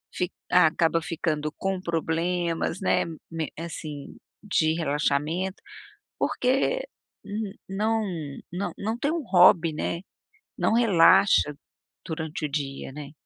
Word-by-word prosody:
Fi 180 0 -1 0.2
acaba 165 -1 +4
ficando 155 -3 -2
com 190 -1 -2
problemas, 170 +1 -1
né, - - +2 0.3
men 160 -2 -3
assim, 155 -4 -7 0.3
de 160 -6 +2
relaxamento. 155 +4 -1 0.6
Porque 275 - +1 0.8
não 215 +4 0 0.5
não 185 +3 -3
não 220 +3 -2
tem 290 +4 0
um 335 - -2
hobby, 175 -5 +6
né. 170 +2 -2 0.6
Não - - +2
relaxa 195 -7 +5 0.5
durante 160 -2 -4
o - - -3
dia, 140 -2 -4
né? 145 -1 -8
170 Hz, 110 wpm, -26 LUFS, 155-195 Hz, 0.8 s, hobby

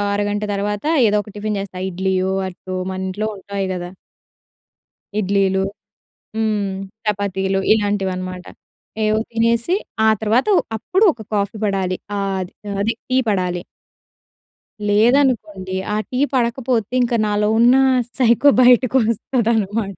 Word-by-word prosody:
అరగంట 205 0 -1
తర్వాత 205 +2 -2 0.2
ఏదో 210 0 +2
ఒక 210 - -13
టిఫిన్ 210 0 -2
జేస్తా. 195 -2 -6
ఇడ్లీయో, 190 +1 -1 0.2
అట్టో 185 +1 -8 0.2
మన 185 - -5
ఇంట్లో 210 +3 -2
ఉంటాయి 195 0 -4
గదా. 175 -1 -5 1.3
ఇడ్లీలు 195 -1 +1 0.7
హ్మ్, 215 -3 0 0.4
చపాతీలు 195 -2 0
ఇలాంటివన్నమాట. 190 -4 -1 0.6
ఏవో 215 0 +2
తినేసి, 230 +7 +1 0.3
ఆ - - +6
తర్వాత 225 - +1 0.3
అప్పుడు 375 - +1
ఒక 230 - -11
కాఫీ 200 +1 -1
పడాలి. 190 -2 0 0.2
ఆహ్, 200 -1 -1
ఆది, 195 +3 -7
అది 215 +3 +1 0.2
టీ 255 - +1
పడాలి. 180 -3 -1 1.3
లేదనుకోండి. 215 -4 +2 0.2
ఆ - - 0
టీ 250 - -1
పడకపోతే 240 -2 0
ఇంక 245 0 0
నాలో 210 0 +1
ఉన్న 240 +2 +6 0.4
సైకో 245 +3 +5
బయటికొస్తదనమాట. 230 -4 +2
205 Hz, 115 wpm, -19 LUFS, 190-230 Hz, 1.3 s, ఆ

